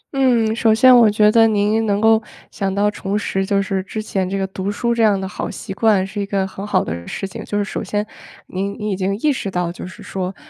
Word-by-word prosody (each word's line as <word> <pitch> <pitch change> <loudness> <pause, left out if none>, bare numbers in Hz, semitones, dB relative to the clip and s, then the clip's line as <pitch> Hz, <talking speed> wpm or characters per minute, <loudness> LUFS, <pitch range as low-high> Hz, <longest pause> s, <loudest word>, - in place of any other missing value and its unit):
嗯， 235 -5 +2
首 225 -1 +3
先 255 +2 +7
我 230 -3 +7
觉 210 0 +4
得 225 0 +5
您 215 +1 +1
能 200 0 +1
够 220 0 +4 0.3
想 195 -2 -2
到 205 +1 +2
重 200 0 -3
拾 195 -2 -1
就 195 0 +1
是 195 -1 -2
之 205 +3 -6
前 190 -3 -2
这 195 - -2
个 195 - -1
读 190 +1 -4
书 235 +3 -1
这 235 - 0
样 205 -3 +4
的 190 - -4
好 - - -5
习 195 - -7
惯 205 -3 +2
是 205 +1 -5
一 - - -2
个 195 -2 0
很 195 +2 -7
好 - - +2
的 85 +1 -6
事 195 - -4
情。 - - -8
就 205 - -3
是 205 - +1
首 200 - -4
先 205 +2 -2 0.4
您 195 +2 -4
您 210 -2 -3
已 - - 0
经 195 +1 -1
意 295 +4 +1
识 200 - -4
到 180 -2 -2
就 180 - -8
是 185 - -12
说， 185 0 -4
205 Hz, 280 characters per minute, -19 LUFS, 190-220 Hz, 0.4 s, 先